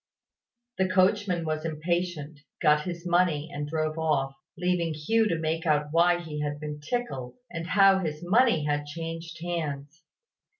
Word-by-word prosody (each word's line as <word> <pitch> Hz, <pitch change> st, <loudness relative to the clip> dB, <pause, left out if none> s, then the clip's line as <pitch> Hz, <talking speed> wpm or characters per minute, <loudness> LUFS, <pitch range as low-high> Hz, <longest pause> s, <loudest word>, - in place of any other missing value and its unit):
The 190 Hz, 0 st, +2 dB
coachman 185 Hz, -2 st, +2 dB
was 155 Hz, 0 st, -2 dB
impatient, 160 Hz, -1 st, -2 dB, 0.2 s
got 150 Hz, -2 st, +3 dB
his 175 Hz, -1 st, -5 dB
money, 175 Hz, -3 st, +2 dB
and 145 Hz, 0 st, -3 dB
drove 155 Hz, +1 st, -2 dB
off, 140 Hz, -4 st, +1 dB, 0.2 s
leaving 175 Hz, -2 st, 0 dB
Hugh 220 Hz, +9 st, +2 dB
to 170 Hz, -, 0 dB
make 160 Hz, +1 st, -2 dB
out 150 Hz, -1 st, +2 dB
why 175 Hz, +2 st, +4 dB
he 155 Hz, -3 st, -5 dB
had 145 Hz, 0 st, -3 dB
been 150 Hz, -1 st, -5 dB
tickled, 150 Hz, -, -3 dB, 0.2 s
and 165 Hz, -1 st, -5 dB
how 195 Hz, 0 st, +5 dB
his 155 Hz, -2 st, -4 dB
money 200 Hz, -, +3 dB
had 145 Hz, 0 st, -1 dB
changed 165 Hz, +2 st, -6 dB
hands. 155 Hz, -3 st, -4 dB
165 Hz, 155 wpm, -27 LUFS, 150-175 Hz, 0.2 s, how